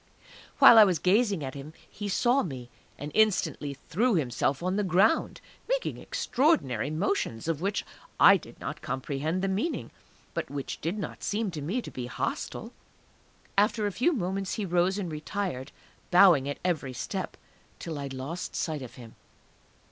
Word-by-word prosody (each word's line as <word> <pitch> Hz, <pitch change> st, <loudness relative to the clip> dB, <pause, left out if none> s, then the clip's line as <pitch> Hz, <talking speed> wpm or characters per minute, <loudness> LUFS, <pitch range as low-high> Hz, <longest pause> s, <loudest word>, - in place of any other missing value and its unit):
While 230 Hz, -, +9 dB
I -, -, +11 dB
was 185 Hz, -4 st, +2 dB
gazing 195 Hz, +1 st, +2 dB
at 135 Hz, 0 st, -5 dB
him 145 Hz, +2 st, -9 dB
he 205 Hz, -1 st, -6 dB
saw 245 Hz, +7 st, +3 dB
me, 125 Hz, -7 st, -6 dB, 0.3 s
and 145 Hz, +1 st, -6 dB
instantly 190 Hz, -9 st, +1 dB
threw 230 Hz, +5 st, +2 dB
himself 135 Hz, 0 st, 0 dB
on 185 Hz, +1 st, 0 dB
the 210 Hz, -, +1 dB
ground, 195 Hz, -, +2 dB, 0.3 s
making -, -, -1 dB
extraordinary 145 Hz, -, +1 dB
motions, 155 Hz, -, -1 dB
of 165 Hz, -2 st, -1 dB
which 200 Hz, +2 st, -1 dB, 0.3 s
I -, -, +9 dB
did -, -, -8 dB
not -, -, -6 dB
comprehend 145 Hz, +7 st, -2 dB
the -, -, +2 dB
meaning, 205 Hz, -, -2 dB, 0.4 s
but -, -, -3 dB
which 140 Hz, -1 st, -5 dB
did 170 Hz, +7 st, -2 dB
not 205 Hz, -, -6 dB
seem 210 Hz, -1 st, -1 dB
to 155 Hz, -3 st, -6 dB
me 200 Hz, -, -2 dB
to -, -, -8 dB
be 125 Hz, -1 st, -5 dB
hostile. -, -, -4 dB, 0.8 s
After 210 Hz, +1 st, +2 dB
a 205 Hz, -, 0 dB
few 250 Hz, -, +2 dB
moments 195 Hz, -, -2 dB
he 210 Hz, -, -2 dB
rose 180 Hz, +2 st, +1 dB
and 185 Hz, -5 st, -3 dB
retired, 155 Hz, -3 st, -4 dB, 0.4 s
bowing 175 Hz, -7 st, +6 dB
at 145 Hz, -, -3 dB
every 150 Hz, -7 st, -1 dB
step, -, -, -4 dB, 0.4 s
till 160 Hz, -3 st, -6 dB
I 140 Hz, -, -4 dB
lost 135 Hz, +6 st, -5 dB
sight 155 Hz, -5 st, -2 dB
of 125 Hz, -, -9 dB
him. 115 Hz, -3 st, -12 dB
175 Hz, 165 wpm, -28 LUFS, 140-205 Hz, 0.8 s, I